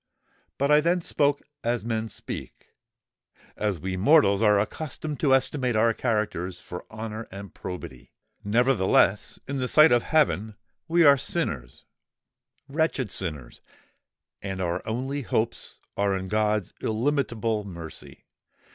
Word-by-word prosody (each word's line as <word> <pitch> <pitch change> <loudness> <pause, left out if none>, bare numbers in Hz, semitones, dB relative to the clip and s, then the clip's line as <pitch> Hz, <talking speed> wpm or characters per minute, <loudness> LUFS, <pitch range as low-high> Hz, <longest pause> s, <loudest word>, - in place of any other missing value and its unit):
But 140 +2 +1
I 150 0 +6
then 175 +3 +1
spoke 145 -3 +1 0.2
as 120 -1 -1
men 110 -1 -2
speak—as 105 -3 -8
we 95 +3 -3
mortals 100 - +5
are 105 -2 +5
accustomed 150 +5 -4
to 135 -3 +4
estimate 130 -2 0
our 115 +1 +3
characters 105 -7 -2
for 90 - -9
honour 110 0 -6
and 100 +1 -9
probity. 85 -9 -8 0.3
Nevertheless, 105 -3 +2
in 140 +1 -3
the 130 -1 -1
sight 155 +4 +6
of 120 -1 +5
heaven, 110 -8 +1 0.3
we 170 +1 +4
are 140 -2 +7
sinners—wretched 130 - -4
sinners; 75 -10 -4 0.8
and 95 -1 -5
our 90 0 -1
only 130 +6 -2
hopes 115 -2 -2 0.2
are 100 -1 +1
in 95 0 -6
God's 105 -2 0
illimitable 115 -3 0
mercy! 85 -5 -10
110 Hz, 120 wpm, -26 LUFS, 95-135 Hz, 0.8 s, are